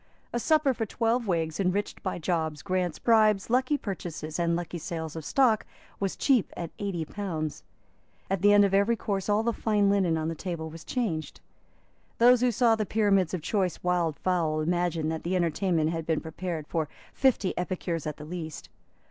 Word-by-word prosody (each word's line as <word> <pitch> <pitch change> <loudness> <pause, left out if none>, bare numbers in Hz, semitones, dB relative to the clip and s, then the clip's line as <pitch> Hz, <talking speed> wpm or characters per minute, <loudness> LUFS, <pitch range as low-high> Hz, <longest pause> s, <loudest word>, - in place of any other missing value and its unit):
A 240 - 0
supper 305 +1 +3
for 225 -2 -3
twelve 230 +2 0
Whigs, 165 -3 -1
enriched 195 +2 -1
by 185 - -3
jobs, 160 -3 -2
grants, 185 -4 -1
bribes, 215 -3 +3
lucky 260 +4 +2
purchases 170 - -5
and 170 0 +2
lucky 175 0 -4
sales 160 -1 -5
of 160 - -5
stock, 235 - +3 0.4
was 195 -1 -1
cheap 260 -7 +2
at 170 -2 -5
eighty 190 -5 -2
pounds. 160 -6 -4 0.7
At 195 -2 -1
the 205 +1 +6
end 205 0 +7
of 195 - -1
every 200 +4 +4
course 200 -3 -3
all 210 +2 +3
the 235 0 +1
fine 210 -3 +2
linen 185 -5 +2
on 160 0 -2
the 165 - -1
table 165 -2 -5
was 165 0 -10
changed. 190 -12 -3 0.8
Those 245 +1 +6
who 250 -1 +3
saw 230 0 +4
the 220 - -1
pyramids 195 -4 +2
of 165 - -6
choice 190 -3 -1
wild 175 -4 +1
fowl 165 -4 0
imagined 170 -1 0
that 160 - -3
the 180 +2 -1
entertainment 170 -2 +1
had 165 -1 -4
been 160 -2 +1
prepared 165 -1 -5
for 155 -2 -2 0.2
fifty 255 -8 +2
epicures 175 -3 -3
at 150 - -4
the 150 - -9
least. 160 -1 -7
180 Hz, 185 wpm, -28 LUFS, 160-210 Hz, 0.8 s, end